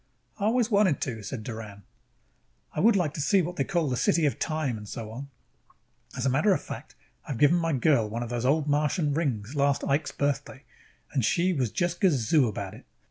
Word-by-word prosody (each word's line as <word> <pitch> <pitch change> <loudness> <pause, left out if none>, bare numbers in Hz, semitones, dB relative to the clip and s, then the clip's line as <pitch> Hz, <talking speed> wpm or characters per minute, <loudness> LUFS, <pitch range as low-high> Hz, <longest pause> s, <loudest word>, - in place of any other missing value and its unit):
"I 200 - 0
always 235 +1 +2
wanted 200 -8 +3
to," 115 -5 -3
said 110 +2 -6
Doran. 110 -3 -8 0.9
"I - - -3
would 225 +5 +5
like 170 -6 +1
to 150 - -4
see 195 +7 +3
the 175 - +1
what 175 +1 -6
they 135 - +2
call 155 -6 0
City 155 +6 +2
of 140 -6 0
Time, 155 -6 -1
and 105 -1 -9
so 110 -2 -6
on. 135 +5 -8 0.9
As 130 - -2
a - - +3
matter 155 +11 +3
of - - -3
fact, - - -8 0.3
I - - -2
have 115 - -6
given 150 +4 +5
my 165 -2 0
girl 125 -4 +2
one 115 +3 -3
of 120 - -6
those 120 -1 -2
Old 145 +4 +2
Martian 150 +1 +1
rings 130 -7 -2
last 140 -1 +1
Ike's 145 +2 0
Birthday 140 -1 -2 0.5
and 135 -4 +1
she 175 +11 +2
was 130 -7 0
just 175 - -2
gazoo 145 - +3
about 110 - -5
it. - - -14
140 Hz, 215 wpm, -27 LUFS, 120-165 Hz, 0.9 s, would